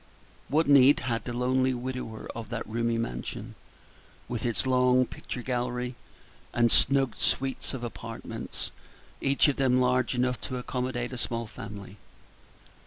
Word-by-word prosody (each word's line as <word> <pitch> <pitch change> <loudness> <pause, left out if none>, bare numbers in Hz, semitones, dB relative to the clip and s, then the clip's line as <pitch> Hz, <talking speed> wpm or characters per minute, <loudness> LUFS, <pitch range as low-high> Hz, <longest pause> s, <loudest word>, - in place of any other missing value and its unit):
What 155 +3 +2
need 140 0 +7
had 120 -3 -2
the 125 - -3
lonely 130 +1 +2
widower 125 -3 -5
of 115 -2 -7
that 115 -1 -3
roomy 115 +1 0
mansion, 60 - -4 0.7
with 120 0 -2
its 105 -4 0
long 125 0 +4
picture 125 0 -7
gallery 125 0 -2 0.6
and 120 -1 +3
snug 135 -3 +4
suites 135 0 0
of 125 - -6
apartments, 120 - -6 0.5
each 135 +2 +4
of 145 - +1
them 130 -2 +3
large 125 0 +2
enough 125 0 0
to 130 - -4
accommodate 125 0 -3
a 125 - -4
small 115 -1 -1
family? 105 -2 -9
125 Hz, 140 wpm, -28 LUFS, 115-130 Hz, 0.7 s, need